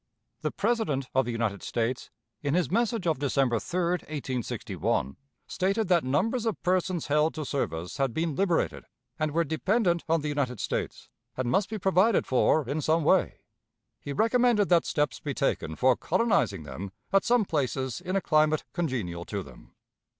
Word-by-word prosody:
The - - 0
President 200 - -1
of 130 0 +3
the 120 - -2
United 115 -4 -2
States, 120 +2 -2 0.3
in 145 +1 0
his 175 -5 +1
message 230 -2 0
of 160 -5 +1
December 135 -4 +1
3, 180 - -3 0.3
1861, 130 - -2 0.3
stated 195 +2 -1
that 175 -3 +4
numbers 220 - 0
of 220 - -1
persons 185 -2 0
held 150 +2 +2
to 155 - -4
service 85 - -3
had 135 -2 +1
been 160 +4 -1
liberated 150 - 0 0.3
and 155 0 +1
were 165 +3 +2
dependent 170 +3 +1
on 165 -1 +3
the 150 - -3
United 140 -6 -1
States, - - -3 0.3
and 125 -1 -1
must 195 +8 +2
be 220 - -3
provided 195 +2 +3
for 130 +2 +2
in 145 +4 -1
some 160 +2 +2
way. - - +2 0.6
He 145 - -6
recommended 225 - +3
that 175 -2 +4
steps 145 -5 0
be - - -4
taken 80 - -1
for 130 +5 +4
colonizing 185 - +1
them 95 +7 -7 0.2
at 195 - +5
some 240 -3 +3
places 135 -3 -2
in 185 +1 -2
a 195 - +2
climate 155 -1 +2
congenial 120 - -2
to 100 -2 -4
them. - - -16
155 Hz, 170 wpm, -28 LUFS, 130-185 Hz, 0.6 s, at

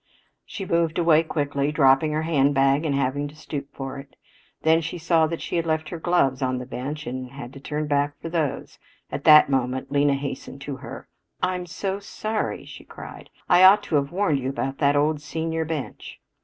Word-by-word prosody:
She 195 - -6
moved 170 -2 +1
away 165 -2 +5
quickly, 145 -3 -1
dropping 140 0 +4
her 155 +1 -1
handbag 140 -1 +2
and 145 -3 0
having 140 +1 0
to 145 - -13
stoop 145 -2 -6
for 135 0 -6
it. 135 0 -13 0.5
Then 160 +1 +4
she 165 +2 -5
saw 165 -1 +2
that 165 +1 -5
she - - -2
had 165 0 -1
left 155 -1 -1
her 170 - -6
gloves 155 -7 +1
on 130 -1 0
the 125 - -5
bench 140 +4 -5
and 130 +1 -5
she 130 - -16
had 130 -2 -8
to 135 - -10
turn 150 +2 -3
back 145 0 0
for - - -6
those. 160 -4 -3 0.3
At 140 +1 -5
that 150 -1 +9
moment 130 -1 -1
Lena 140 0 +3
hastened 140 0 -6
to 140 -1 -5
her. - - -9 0.4
"I'm 180 -1 -1
so 190 +3 -3
sorry," 215 +2 -3
she - - -11
cried. - - -11 0.2
"I 180 +1 +6
ought 200 +2 +8
to - - -2
have 140 +1 -1
warned 175 -6 +1
you 130 0 -2
about 135 0 -3
that 145 -1 +3
old 150 +1 +1
senior 160 +1 -3
bench." 155 -3 -6
150 Hz, 205 wpm, -24 LUFS, 140-165 Hz, 0.5 s, that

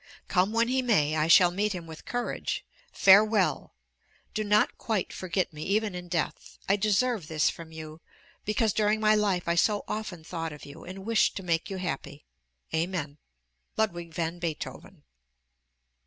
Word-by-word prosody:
Come 185 +2 +2
when 230 +1 +2
he 260 +1 +1
may, 155 -12 +2
I 155 0 +1
shall 175 +1 +7
meet 205 +3 0
him 175 -2 -6
with 160 -1 -11
courage. 245 0 -3 0.3
Farewell! 195 -5 +4 0.6
Do 215 - -1
not 210 0 +2
quite 215 -5 -1
forget 185 -1 -2
me, 150 - -8
even 210 +3 0
in 180 0 -7
death: 170 -3 -3
I 195 - +4
deserve 215 -1 +1
this 155 -2 +2
from 165 -1 -11
you, 160 0 -9 0.4
because 215 0 +1
during 215 0 +2
my 215 0 +4
life 200 -5 +1
I 170 - +3
so 205 +4 +2
often 195 -6 -5
thought 165 -1 -4
of 150 - -11
you, 140 - -11
and 190 +2 -8
wished 225 -1 +2
to 195 - -5
make 165 -2 0
you 195 - -4
happy. 145 -5 -5 0.5
Amen! 160 -3 -2 0.6
LUDWIG 175 -6 -1
VAN 165 +1 -3
BEETHOVEN. 165 -3 -6
185 Hz, 165 wpm, -28 LUFS, 165-210 Hz, 0.6 s, shall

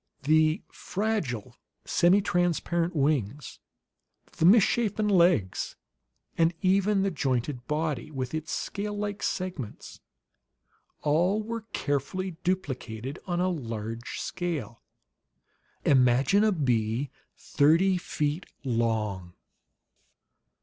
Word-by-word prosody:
The 155 +3 +3
fragile 190 - -3 0.3
semitransparent 175 -2 +2
wings, 140 -3 -1 0.8
the 160 - +2
misshapen 215 +1 +4
legs, 170 - +2 0.6
and 165 +1 +2
even 195 +1 +3
the 195 - +1
jointed 130 -3 -2
body 150 -3 -2
with 130 -3 -4
its 160 0 -4
scale 205 +1 -3
like 205 -1 -3
segments, 180 - -4 1.0
all 175 +8 +2
were 230 0 -5
carefully 145 +7 -2
duplicated 135 - -3
on 175 -1 -1
a 185 +1 +2
large 115 -7 -5
scale. 165 -10 -4 1.0
Imagine 130 - +4
a 215 - +4
bee 125 - 0 0.3
thirty 165 +7 +3
feet 150 0 -2 0.2
long! 110 -7 -1
155 Hz, 90 wpm, -28 LUFS, 130-185 Hz, 1.0 s, misshapen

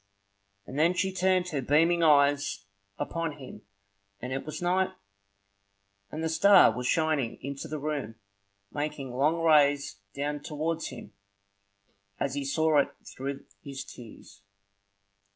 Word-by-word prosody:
And 135 +6 -5
then 170 +3 +3
she 190 +1 0
turned 185 -1 +1
her 145 -5 -2
beaming 165 +6 +3
eyes 140 -9 +3 0.3
upon 165 +2 -3
him 135 -3 -10 0.6
and 125 +4 -5
it 135 +3 -4
was 155 - -5
night; 185 +2 +1 1.2
and 155 +1 -4
the - - +1
star 160 - +6
was 125 0 -3
shining 155 -7 +1
into 140 +3 -5
the 155 0 -4
room, 145 -6 -4 0.6
making 145 -3 -4
long 155 +6 +1
rays 145 -7 +4 0.2
down 145 +1 -2
towards 155 +3 -3
him 120 -5 -10 1.1
as 135 - -1
he 140 0 -2
saw 155 +2 +3
it 140 - +2 0.2
through 135 +1 -6 0.2
his 140 -2 -7
tears. 110 -4 -13
145 Hz, 135 wpm, -28 LUFS, 135-160 Hz, 1.2 s, star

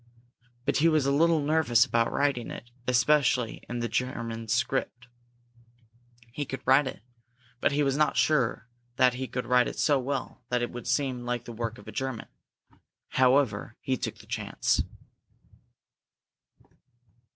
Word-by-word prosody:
But 140 - +1
he 160 - +4
was 155 -4 +2
a 140 - +2
little 160 +2 +3
nervous 145 -6 +3
about 115 0 +1
writing 140 -4 0
it, 120 - -9 0.2
especially 125 -1 +2
in 120 0 -3
the 120 - -1
German 115 -1 -3
script. 125 +2 -1 1.3
He 145 - -2
could 135 -1 -6
write 135 +1 +5
it, 120 - -7 0.6
but - - +2
he 145 +1 +1
was 135 -1 +1
not 150 +1 +2
sure 125 -6 +1 0.3
that 125 -1 +4
he 130 +1 -4
could 125 0 -4
write 125 -1 +3
it - - -6
so 145 -3 +3
well 135 0 -4
that 125 -1 0
it 120 - -3
would 120 -1 -8
seem 130 -4 0
like 120 0 -3
the 120 - -7
work 115 0 -4
of - - -15
a - - -6
German. 130 -4 -4 0.8
However, 130 -5 +2
he 130 - -1
took 120 -3 -4
the - - -15
chance. 110 -2 0
125 Hz, 155 wpm, -28 LUFS, 120-140 Hz, 1.3 s, write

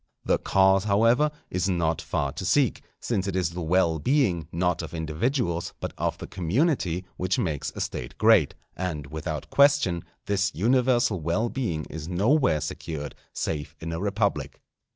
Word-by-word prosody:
The - - +2
cause, 95 0 +3
however, 115 +8 +4 0.2
is 90 +2 0
not 85 -3 0
far - - -1
to - - -6
seek, - - +2 0.2
since 100 -5 -1
it 95 - -2
is 90 -3 0
the 90 +1 -5
well 85 -1 +2
being, 100 - +1
not 90 0 0
of 80 0 -7
individuals, 85 - -1
but - - -4
of - - -1
the - - -7
community 95 - 0
which 90 +1 0
makes 75 -5 -2
a - - -4
State - - -5
great; - - +4 0.2
and, 85 -6 -3
without 80 0 -5
question, 140 -12 +4 0.2
this 100 0 0
universal 120 -1 +2
well 85 +9 0
being 95 - -2
is 80 0 -7
nowhere 100 - +2
secured 75 -3 -5 0.2
save 75 -3 -3
in 85 0 -5
a 80 - -3
republic. 100 -9 -1
90 Hz, 160 wpm, -26 LUFS, 80-110 Hz, 0.2 s, however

